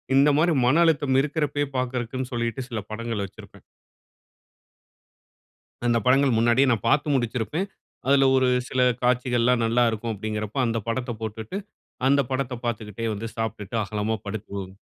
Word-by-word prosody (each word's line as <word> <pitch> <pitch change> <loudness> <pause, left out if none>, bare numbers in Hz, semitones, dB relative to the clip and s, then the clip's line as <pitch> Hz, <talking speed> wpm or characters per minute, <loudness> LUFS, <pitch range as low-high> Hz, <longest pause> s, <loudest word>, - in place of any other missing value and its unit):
இந்த 140 +2 +6
மாதிரி 165 +2 +3
மன 150 +7 +4
அழுத்தம் 145 -5 +2
இருக்கிறப்பயே 145 -1 -1
பார்க்கிறக்குன்னு 125 0 -3
சொல்லிட்டு 120 +2 -2
சில 115 -3 -3
படங்கள் 115 -1 -3
வச்சிருப்பேன். 95 - -14 2.2
அந்த 120 -1 +3
படங்கள் 135 +1 +4
முன்னாடியே 120 +4 +4
நான் 115 -1 -1
பாத்து 145 +3 +2
முடிச்சிருப்பேன். 125 - -1 0.4
அதுல 135 0 +5
ஒரு 130 -1 +3 0.2
சில 130 - 0 0.2
காட்சிகள்லாம் 125 -1 +2
நல்லா 120 +2 +3
இருக்கும் 110 +1 -3
அப்டீங்கிறப்ப 105 +2 -4
அந்த 115 -1 0
படத்தைப் 120 -1 -3
போட்டுட்டு, 110 - -5 0.5
அந்த 140 +1 +5
படத்தை 130 -2 -2
பாத்துக்கிட்டே 115 -1 -3
வந்து 115 +3 -5
சாப்பிட்டுட்டு 110 -1 -3
அகலமா 105 +2 -2
படுத்து 110 +1 -5
தூங் 95 -1 -6
120 Hz, 135 wpm, -25 LUFS, 110-135 Hz, 2.2 s, இந்த